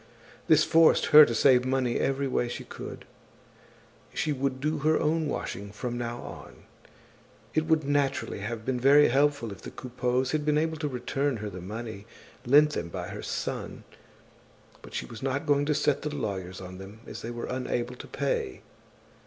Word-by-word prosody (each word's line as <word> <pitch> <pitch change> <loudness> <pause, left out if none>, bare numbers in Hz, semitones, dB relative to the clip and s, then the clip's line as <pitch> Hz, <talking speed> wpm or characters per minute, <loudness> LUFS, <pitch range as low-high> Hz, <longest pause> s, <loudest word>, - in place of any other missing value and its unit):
This - - +6
forced 165 0 +5
her 150 0 +11
to 115 - -2
save 125 +1 +5
money 130 -2 0
every 135 0 0
way 125 -2 0
she 120 - -5
could. - - -9 1.1
She 155 - 0
would 135 -1 -2
do 150 +2 -1
her 155 +2 +2
own 160 0 +1
washing 100 -7 -4
from 120 +4 -4
now 120 0 -4
on. - - -11 0.9
It 155 0 +1
would 160 -1 +3
naturally 140 -5 0
have 110 +2 -5
been 130 -1 -1
very 140 +3 +6
helpful 140 -3 +2
if 100 - -10
the - - -7
Coupeaus 125 0 -2
had 155 -1 0
been 150 0 +2
able 160 +1 0
to 150 -1 -2
return 135 +1 -1
her 105 -1 -5
the 90 -1 -8
money 110 +2 -7 0.4
lent 150 +4 +6
them 85 - -3
by - - -5
her - - -6
son; - - -4 1.0
but - - -11
she - - -2
was 115 -2 -10
not 135 +3 -1
going 145 -1 +2
to 150 0 +1
set 145 -1 +1
the 150 - -3
lawyers 95 -10 -4
on 90 0 -9
them, 100 +3 -11
as - - -8
they 115 - -5
were 120 0 -5
unable 125 -1 -2
to - - -10
pay. 465 -5 -2
130 Hz, 185 wpm, -28 LUFS, 115-145 Hz, 1.1 s, her